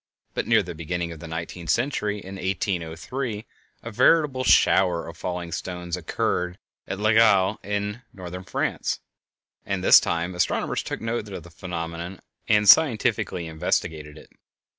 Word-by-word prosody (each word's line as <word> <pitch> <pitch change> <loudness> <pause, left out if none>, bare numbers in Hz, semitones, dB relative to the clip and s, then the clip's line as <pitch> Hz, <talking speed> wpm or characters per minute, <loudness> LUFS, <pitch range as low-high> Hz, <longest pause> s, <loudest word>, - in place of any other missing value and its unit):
But - - -2
near 110 -2 +4
the 90 -1 -6
beginning 85 +1 -3
of 80 - -9
the 85 - -8
nineteenth 85 +1 -6
century, 110 -5 0
in 95 0 -9
1803, 95 +5 -3 0.4
a 115 - -6
veritable 140 +2 +3
shower 90 -7 +4
of 85 - -8
falling 90 -1 -4
stones 90 0 -4
occurred 90 +1 -2 0.3
at - - -3
L'Aigle, 105 -2 +4
in 105 +3 -3
Northern 90 -1 -8
France, - - -2 0.6
and - - -3
this - - +9
time 85 +2 -2
astronomers 90 +1 0
took - - -5
note 115 -2 -3
of - - -6
the 90 - -14
phenomenon 85 +1 -6 0.3
and 105 -1 +3
scientifically 110 - +4
investigated 80 -1 -2
it. - - -15
90 Hz, 140 wpm, -25 LUFS, 85-105 Hz, 0.6 s, this